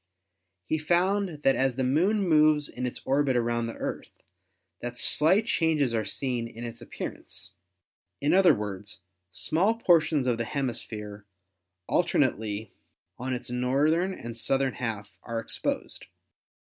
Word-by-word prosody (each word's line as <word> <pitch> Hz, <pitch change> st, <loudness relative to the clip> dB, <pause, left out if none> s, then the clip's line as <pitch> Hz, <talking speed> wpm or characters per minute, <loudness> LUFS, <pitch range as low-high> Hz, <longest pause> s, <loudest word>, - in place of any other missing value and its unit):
He 155 Hz, -, -1 dB
found 175 Hz, 0 st, +1 dB
that 135 Hz, -, +4 dB
as 130 Hz, -2 st, +1 dB
the 130 Hz, -, -1 dB
Moon 185 Hz, +10 st, +2 dB
moves 155 Hz, -2 st, +4 dB
in 125 Hz, 0 st, -4 dB
its 125 Hz, -, -6 dB
orbit 135 Hz, -1 st, +2 dB
around 120 Hz, -1 st, 0 dB
the 115 Hz, -, -6 dB
Earth -, -, -5 dB, 0.7 s
that 120 Hz, 0 st, -6 dB
slight 185 Hz, -, +4 dB
changes 155 Hz, -, +1 dB
are 110 Hz, -1 st, +1 dB
seen 120 Hz, +2 st, -2 dB
in 115 Hz, 0 st, -9 dB
its 115 Hz, 0 st, -7 dB
appearance. 95 Hz, -4 st, -7 dB, 0.7 s
In 145 Hz, -, +1 dB
other 190 Hz, -1 st, +6 dB
words, 105 Hz, -1 st, -5 dB, 0.3 s
small 165 Hz, -, +1 dB
portions 165 Hz, -, +3 dB
of 120 Hz, -2 st, 0 dB
the 115 Hz, -, -1 dB
hemisphere 110 Hz, -6 st, -4 dB, 0.6 s
alternately 110 Hz, -, 0 dB, 0.5 s
on 130 Hz, +1 st, -2 dB
its 125 Hz, 0 st, -6 dB
north 130 Hz, +5 st, +2 dB
ern 185 Hz, +3 st, 0 dB
and 115 Hz, -1 st, -7 dB
southern 135 Hz, +2 st, 0 dB
half 105 Hz, -5 st, -5 dB
are 115 Hz, -1 st, -5 dB
exposed. 115 Hz, -, -4 dB
130 Hz, 140 wpm, -27 LUFS, 115-155 Hz, 0.7 s, other